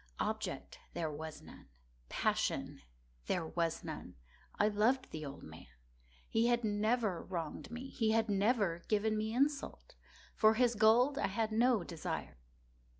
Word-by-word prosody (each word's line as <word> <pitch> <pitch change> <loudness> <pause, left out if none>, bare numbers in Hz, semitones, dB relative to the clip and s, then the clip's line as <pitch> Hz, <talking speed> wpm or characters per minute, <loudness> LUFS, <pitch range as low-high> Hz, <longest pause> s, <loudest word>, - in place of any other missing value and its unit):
Object - - -3 0.2
there 160 -3 -1
was 155 +1 -7
none. - - -14 0.4
Passion - - -1 0.5
there 175 -3 0
was 165 0 -1
none. - - -7 0.4
I 210 - +4
loved 225 +5 +2
the 155 - -5
old 140 -1 -7
man. 80 0 -11 0.6
He 225 +1 +2
had 240 0 +2
never 215 -2 +1
wronged 170 -2 -5
me. 245 +3 -6
He 225 -4 0
had 225 +1 +3
never 200 -3 +2
given 215 0 +2
me 215 +1 -1
insult. 275 +4 -1 0.4
For 220 0 +5
his 245 0 +3
gold 235 +6 +4
I - - +2
had 220 +3 -1
no 230 -2 +3
desire. 165 - -5
215 Hz, 145 wpm, -35 LUFS, 175-235 Hz, 0.6 s, For